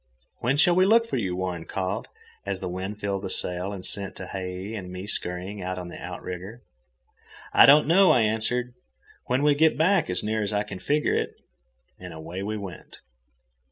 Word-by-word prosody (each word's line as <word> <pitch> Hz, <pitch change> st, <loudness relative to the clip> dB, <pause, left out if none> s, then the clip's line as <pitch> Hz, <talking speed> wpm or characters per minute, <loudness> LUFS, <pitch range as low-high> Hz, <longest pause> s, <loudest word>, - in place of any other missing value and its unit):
"When 130 Hz, +4 st, +1 dB
shall 175 Hz, +4 st, +6 dB
we 185 Hz, +2 st, +4 dB
look 230 Hz, +2 st, +5 dB
for 230 Hz, -, -3 dB
you?" 95 Hz, -6 st, -1 dB
Warren 90 Hz, -3 st, -3 dB
called, 95 Hz, +2 st, -3 dB, 0.4 s
as -, -, -3 dB
the 95 Hz, -, -4 dB
wind 95 Hz, +4 st, -5 dB
filled 100 Hz, -2 st, -2 dB
the 95 Hz, -, -4 dB
sail 90 Hz, +1 st, -1 dB
and 95 Hz, -2 st, -6 dB
sent 100 Hz, -1 st, -2 dB
Tehei 95 Hz, +2 st, -6 dB
and 90 Hz, -4 st, -6 dB
me 90 Hz, +1 st, -6 dB
scurrying 95 Hz, 0 st, -4 dB
out 90 Hz, 0 st, -3 dB
on 90 Hz, -1 st, -6 dB
the -, -, -9 dB
outrigger. 90 Hz, +5 st, -7 dB, 0.9 s
"I -, -, +8 dB
don't 145 Hz, +2 st, +8 dB
know," 185 Hz, +4 st, +6 dB
I 125 Hz, -, +5 dB
answered. 115 Hz, +3 st, 0 dB, 0.5 s
"When 130 Hz, +3 st, +1 dB
we 150 Hz, 0 st, +5 dB
get 155 Hz, +1 st, +3 dB
back, 175 Hz, -, +3 dB
as 90 Hz, -, 0 dB
near 110 Hz, +1 st, -1 dB
as 105 Hz, 0 st, -2 dB
I 105 Hz, 0 st, +1 dB
can 100 Hz, -2 st, -8 dB
figure 150 Hz, +7 st, +1 dB
it." -, -, -1 dB, 0.6 s
And 90 Hz, -2 st, -9 dB
away 85 Hz, +4 st, -6 dB
we 105 Hz, +2 st, -3 dB
went. 100 Hz, -3 st, -9 dB
100 Hz, 190 wpm, -26 LUFS, 90-125 Hz, 0.9 s, I